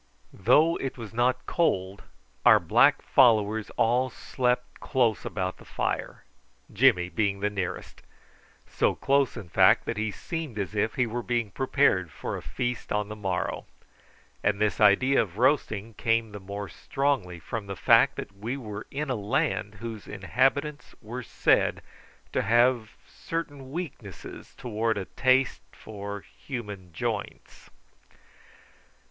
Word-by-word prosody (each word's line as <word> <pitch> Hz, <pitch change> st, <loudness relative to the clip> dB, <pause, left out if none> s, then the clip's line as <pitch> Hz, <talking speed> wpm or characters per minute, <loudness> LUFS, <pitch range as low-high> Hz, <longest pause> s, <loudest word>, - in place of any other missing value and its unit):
Though 150 Hz, -, +4 dB
it 135 Hz, -1 st, -4 dB
was 115 Hz, -2 st, -8 dB
not 125 Hz, +2 st, +1 dB
cold 95 Hz, -, 0 dB, 0.4 s
our -, -, +7 dB
black -, -, +4 dB
followers 110 Hz, -4 st, +3 dB
all 125 Hz, +3 st, +2 dB
slept 125 Hz, 0 st, -2 dB
close 120 Hz, -5 st, +1 dB
about 95 Hz, -1 st, -3 dB
the -, -, -15 dB
fire, -, -, -3 dB, 0.5 s
Jimmy 105 Hz, -5 st, +4 dB
the 100 Hz, +2 st, 0 dB
nearest 95 Hz, -3 st, -5 dB, 0.6 s
so -, -, 0 dB
close, 140 Hz, -2 st, +1 dB
in 105 Hz, -6 st, -7 dB
fact, 80 Hz, -, +4 dB
that -, -, -3 dB
he 110 Hz, 0 st, -1 dB
seemed 155 Hz, +2 st, -5 dB
as 100 Hz, 0 st, -3 dB
if 110 Hz, +1 st, 0 dB
he 125 Hz, -, +2 dB
were 120 Hz, +1 st, -3 dB
being 120 Hz, -3 st, -1 dB
prepared 130 Hz, -, +2 dB
for -, -, -5 dB
a -, -, -6 dB
feast 120 Hz, -1 st, -4 dB
on 105 Hz, 0 st, -1 dB
the 105 Hz, -, -6 dB
morrow; 95 Hz, -4 st, -3 dB, 0.8 s
and 100 Hz, 0 st, +1 dB
this 105 Hz, 0 st, 0 dB
idea 120 Hz, +7 st, +5 dB
of 95 Hz, -2 st, -5 dB
roasting 115 Hz, -4 st, +1 dB
came 115 Hz, 0 st, 0 dB
the 105 Hz, -, -7 dB
more 100 Hz, +1 st, -6 dB
strongly 130 Hz, -8 st, -1 dB
from 100 Hz, +6 st, -5 dB
the 100 Hz, -, -5 dB
fact -, -, +5 dB
that 100 Hz, -, -7 dB
we 115 Hz, +7 st, -4 dB
were 110 Hz, -5 st, -7 dB
in 145 Hz, 0 st, -3 dB
a -, -, +1 dB
land 105 Hz, 0 st, -1 dB
whose 110 Hz, +1 st, -7 dB
inhabitants 135 Hz, +9 st, -1 dB
were 120 Hz, +4 st, -6 dB
said -, -, +1 dB, 0.5 s
to -, -, +2 dB
have 120 Hz, +1 st, +2 dB
certain 145 Hz, -5 st, -6 dB
weaknesses 135 Hz, -, -8 dB
towards 110 Hz, -2 st, -1 dB
a 95 Hz, -, -4 dB
taste 130 Hz, +3 st, +2 dB
for 100 Hz, -1 st, -7 dB
human 105 Hz, -10 st, -8 dB
joints. 80 Hz, -, -5 dB
110 Hz, 140 wpm, -27 LUFS, 100-130 Hz, 0.8 s, our